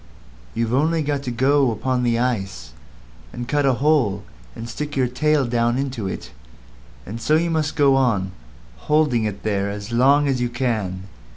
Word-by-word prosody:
You've 115 0 -1
only 155 +4 +2
got 145 -1 -1
to - - -2
go 135 +3 +2
upon 125 +3 -1
the 120 -1 +1
ice, 100 - -2 0.6
and 120 0 -6
cut 145 +1 +1
a 135 - +4
hole 125 -8 +1 0.3
and 115 0 -7
stick 150 +5 -5
your 130 -2 +2
tail 150 +3 +1
down 120 0 +1
into 130 -7 -3
it; - - -6 0.7
and 115 +3 -7
so 150 +7 +2
you 170 +1 +1
must 155 -1 -1
go 140 -3 +4
on 105 -8 +1 0.6
holding 150 -7 +3
it 100 -2 -4
there 100 -2 0
as 105 +2 -6
long 140 +5 +4
as 130 -3 0
you 120 - 0
can. 110 -7 -2
125 Hz, 175 wpm, -21 LUFS, 115-145 Hz, 0.7 s, a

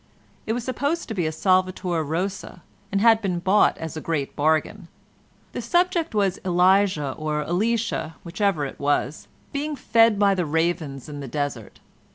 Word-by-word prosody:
It 220 - 0
was 240 0 -3
supposed 285 +7 -2
to - - -2
be 175 -6 -1
a - - -1
Salvator 185 -1 +1
Rosa, 180 +4 -4 0.3
and 200 0 +1
had 225 0 +5
been 185 -4 -1
bought 190 +4 +3
as 160 0 -6
a 155 - -5
great 145 -4 -3
bargain. 160 +5 0 0.6
The - - -5
subject 350 -5 +1
was 195 -3 +1
Elijah 185 -4 +3
or 150 +1 -3
Elisha 215 -1 -1
(whichever 175 -3 0
it 135 - -8
was) 145 0 -1 0.3
being 295 +1 -2
fed 230 -4 +3
by 200 -1 +4
the 180 -4 -1
ravens 160 -4 -1
in 145 -1 -7
the 140 - -6
desert. 135 -4 -4
180 Hz, 165 wpm, -24 LUFS, 155-210 Hz, 0.6 s, had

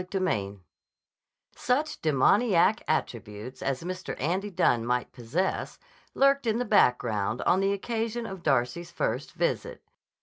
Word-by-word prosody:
CHAPTER 185 +2 -4
V 100 - -1 1.0
SUCH 290 +6 -1
demoniac 190 - +3
attributes 115 -5 -3
as 140 +2 -2
Mr. 185 +1 -5
Andy 185 +8 -1
Dunne 120 - +2
might 125 +1 -1
possess 130 +10 -2 0.4
lurked 275 -2 +3
in 220 0 +2
the 245 - -1
background 115 - +2
on 185 - +3
the 195 0 +2
occasion 230 +3 -2
of 190 -4 -7
Darcy's 135 +3 0
first 170 - -3
visit. - - -2
175 Hz, 130 wpm, -27 LUFS, -, 1.0 s, demoniac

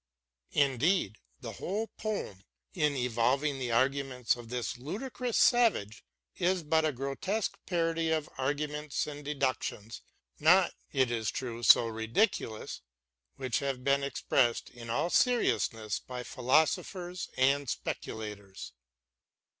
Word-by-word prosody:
Indeed, 140 - +2 0.2
the - - -6
whole 210 +4 -3
poem, 205 - -4 0.3
in 150 -5 +1
evolving 130 +4 +1
the 125 -2 -2
arguments 130 0 +1
of 120 -2 -11
this 125 0 -3
ludicrous 235 - -3
savage, 225 - +3 0.4
is 180 0 +1
but 160 +1 +2
a 155 - +2
grotesque 140 - -2
parody 165 -2 0
of 155 -2 0
arguments 150 +2 -1
and 145 0 -7
deductions 130 -6 -2 0.2
— - - -38
not, 180 +4 +5 0.2
it 130 -3 +2
is 110 -3 -1
true, 120 -3 -4
so 120 - +7
ridiculous 110 - -1 0.3
— 65 0 -53
which 130 -4 -1
have 135 -3 -3
been 140 +1 +3
expressed 125 -3 +1
in 115 -1 -10
all 140 +9 0
seriousness 115 - +2
by 125 -1 -7
philosophers 160 - 0
and 135 +1 +3
speculators. 105 - -5
135 Hz, 120 wpm, -31 LUFS, 120-160 Hz, 0.4 s, so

